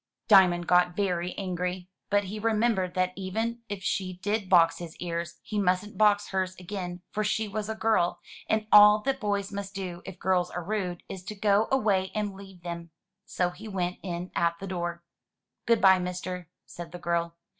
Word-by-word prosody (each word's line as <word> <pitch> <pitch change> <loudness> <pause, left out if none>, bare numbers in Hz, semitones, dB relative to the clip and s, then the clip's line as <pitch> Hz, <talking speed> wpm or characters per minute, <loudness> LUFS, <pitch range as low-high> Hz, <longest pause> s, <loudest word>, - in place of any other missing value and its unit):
Diamond 185 -5 +6
got 180 0 +3
very 180 -3 -1
angry. 180 -1 -3 0.2
But 205 0 +3
he 205 +3 -6
remembered 215 -4 +1
that 185 0 +1
even 225 +5 -3
if 205 -2 -5
she 185 -1 -1
did 205 +2 -2
box 170 -3 +5
his 170 -2 -8
ears, 170 -1 -4
he 210 - -3
mustn't 190 +2 0
box 205 -1 +3
hers 185 -1 -1
again, 180 -1 -6
for 215 - -1
she 215 +1 0
was 210 +1 -4
a 220 - -2
girl, 215 -6 +1 0.3
and 215 0 +1
all 210 0 +8
that 270 0 0
boys 205 -3 -1
must 200 0 -6
do, 180 -3 -5
if 190 - -9
girls 180 -1 +1
are 180 - -5
rude, 180 -2 -3
is 185 -2 -7
to 210 - -6
go 205 +1 +3
away 205 -8 +2
and 210 -2 -1
leave 190 -2 -13
them. 170 -1 -6 0.4
So 180 -1 -1
he 195 +5 -10
went 180 -3 -2
in 180 -1 -5
at 170 0 +1
the 195 - -7
door. 175 -2 -4 0.6
"Good 230 -1 +4
bye, 190 -1 +7
mister," 180 -1 -5 0.2
said 170 -1 -9
the - - -5
girl. 170 -1 -1
185 Hz, 190 wpm, -28 LUFS, 175-205 Hz, 0.6 s, all